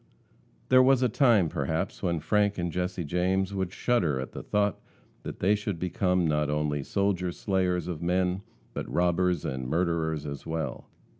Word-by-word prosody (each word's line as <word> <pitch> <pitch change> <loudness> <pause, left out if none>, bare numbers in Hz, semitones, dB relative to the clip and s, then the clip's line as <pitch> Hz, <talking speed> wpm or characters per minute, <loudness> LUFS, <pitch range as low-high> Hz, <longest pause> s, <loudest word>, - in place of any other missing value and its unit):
There 130 0 +7
was 130 0 +4
a 125 - +3
time, 110 - +4
perhaps, 80 +7 -2
when 85 -4 0
Frank 105 +4 +1
and 85 -1 -2
Jesse 90 +1 -2
James 95 +5 0
would 95 -2 -2
shudder 90 - +1
at 65 - -5
the - - -7
thought 105 -1 0 0.4
that - - -7
they 100 +3 +4
should 105 -3 -2
become 90 0 +1
not 75 -1 +1
only 75 -1 0
soldier 95 +1 0
slayers 90 -1 0
of 85 -4 -4
men, 90 +2 +1 0.3
but - - -5
robbers 90 -1 +1
and 65 -1 -3
murderers 80 -2 0
as 70 -2 -6
well. 80 -5 -4
90 Hz, 165 wpm, -28 LUFS, 80-100 Hz, 0.4 s, There